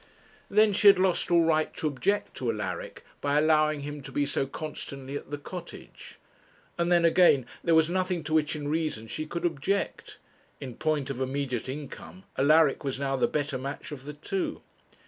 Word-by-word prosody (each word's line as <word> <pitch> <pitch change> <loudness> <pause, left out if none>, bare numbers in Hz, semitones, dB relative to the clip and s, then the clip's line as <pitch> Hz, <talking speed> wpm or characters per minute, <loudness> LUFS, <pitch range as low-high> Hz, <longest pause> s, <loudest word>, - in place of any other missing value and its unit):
Then 210 0 +4
she 205 - +4
had 200 -1 +9
lost 185 -1 +2
all 170 -1 +5
right 155 -1 +2
to - - -4
object 180 +8 0
to 125 - -2
Alaric, 95 -5 -5 0.2
by 145 0 +1
allowing 155 -1 +3
him 145 +1 -6
to - - -10
be 145 - +1
so 140 -1 -1
constantly 140 -2 -7
at - - -6
the 145 - -3
Cottage; 175 +4 -10 0.6
and 170 0 0
then 170 -1 +5
again, 165 -6 +5 0.2
there 165 -1 +3
was 160 -1 +5
nothing 180 -1 -1
to 155 +2 -4
which 155 -1 +2
in 145 -1 -4
reason 155 -7 -1
she 155 +7 -5
could 170 +2 -3
object. 175 +5 -2 0.4
In 130 -3 -7
point 145 0 -1
of 135 -1 -5
immediate 130 -2 -2
income, 150 +6 -8
Alaric 150 +1 +4
was 135 -1 -3
now 135 -1 0
the 130 - +2
better 145 -3 -2
match 140 +3 -6
of 135 -2 -8
the 150 - -6
two. 185 +6 -3
150 Hz, 185 wpm, -28 LUFS, 140-170 Hz, 0.6 s, had